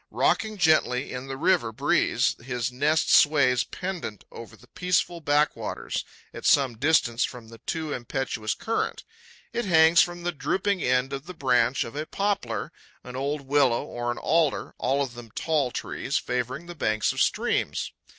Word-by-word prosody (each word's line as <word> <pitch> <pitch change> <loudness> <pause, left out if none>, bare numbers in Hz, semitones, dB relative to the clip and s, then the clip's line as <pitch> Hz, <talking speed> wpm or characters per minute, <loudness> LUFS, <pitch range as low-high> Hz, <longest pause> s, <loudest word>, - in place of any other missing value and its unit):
Rocking 215 -1 +1
gently 155 -7 +2
in 125 +1 -6
the 135 0 -5
river 145 -6 +2
breeze, 110 - +1
his 125 -1 -2
nest 150 +5 +2
sways 140 -5 +5
pendent 180 - -6
over 115 - -10
the 125 - -19
peaceful 180 +1 0
backwaters, 150 0 0 0.3
at - - -9
some 135 -4 +3
distance 130 -5 +2
from 120 -3 -5
the 115 0 -13
too 160 -2 -2
impetuous 120 -3 -3
current. 225 0 -2 0.5
It 240 - -1
hangs 165 -2 +6
from 175 0 -2
the 175 - 0
drooping 185 +6 -1
end 125 +2 +1
of 135 +3 -6
the 180 - -8
branch 125 -3 +2
of 115 - -9
a 155 +1 -4
poplar, 195 - -2 0.3
an 125 0 -9
old 140 +3 -2
willow 135 -3 +2
or 120 0 -3
an 120 - -5
alder, 160 -2 +1
all 140 +1 +1
of 130 -3 -6
them 120 -2 -10
tall 155 -5 +1
trees, - - -3
favouring 125 +6 -3
the 175 - -8
banks 110 -9 0
of - - -1
streams. - - 0
140 Hz, 165 wpm, -26 LUFS, 125-160 Hz, 0.5 s, hangs